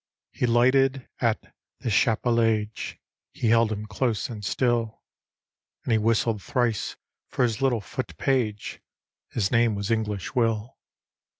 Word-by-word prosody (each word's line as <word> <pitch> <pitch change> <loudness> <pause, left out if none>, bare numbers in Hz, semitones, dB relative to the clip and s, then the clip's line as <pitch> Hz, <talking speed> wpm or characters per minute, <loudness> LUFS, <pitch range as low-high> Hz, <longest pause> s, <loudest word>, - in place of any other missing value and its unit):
He 125 - -1
lighted 130 +2 +3
at 115 -3 -1 0.3
the 120 - -2
Chapellage, 115 -1 +1 0.4
He 115 - 0
held 115 -1 +4
him 105 0 -3
close 110 +2 -1
and 110 -3 -7
sttll; 115 +1 0 0.9
And - - -2
he 110 - +4
whistled 115 -1 +1
thrice 120 -4 -1 0.3
for - - 0
his 115 -2 0
little 125 -5 +2
foot - - -6
page; 115 -6 -1 0.5
His 100 -4 -1
name 115 -2 +3
was 100 +2 -3
English 105 -4 -1
Will. 115 -1 0
115 Hz, 130 wpm, -26 LUFS, 105-120 Hz, 0.9 s, held